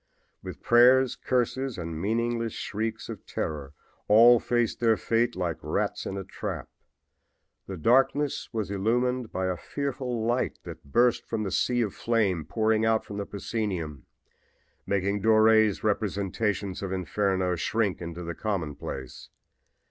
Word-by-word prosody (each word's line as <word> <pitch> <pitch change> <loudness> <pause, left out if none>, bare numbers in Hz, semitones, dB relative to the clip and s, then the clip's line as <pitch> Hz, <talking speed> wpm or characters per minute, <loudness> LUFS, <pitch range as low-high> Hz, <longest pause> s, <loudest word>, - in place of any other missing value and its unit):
With - - -9
prayers, 125 +2 +5
curses 130 +1 -1
and 85 -2 -5
meaningless 115 +2 -1
shrieks 110 +2 -4
of 115 -4 -8
terror 75 -2 -4 0.3
all 115 +3 +7
faced 120 0 0
their 115 -2 +3
fate 115 +5 +1
like 90 -3 -2
rats - - -2
in 100 - -4
a 95 - -4
trap. - - -6 1.0
The 95 - -6
darkness 135 - +2
was 110 -3 -3
illumined 120 +4 0
by 95 - -2
a 90 -1 0
fearful 125 -1 -3
light 120 +2 0
that - - -10
burst 120 - +3
from 110 -2 -2
the 95 - -3
sea 120 +4 +1
of 105 - -3
flame 100 -9 0
pouring 110 +5 +1
out 110 0 +2
from 100 - -7
the 100 - -4
proscenium, 95 - -4 0.8
making 100 +1 0
Dore's 110 -1 +4
representations 100 -1 -1
of 95 -2 -4
Inferno 95 0 0
shrink 105 +2 -1
into 85 +1 -6
the 85 0 -4
commonplace. 80 -10 -5
110 Hz, 140 wpm, -27 LUFS, 95-120 Hz, 1.0 s, all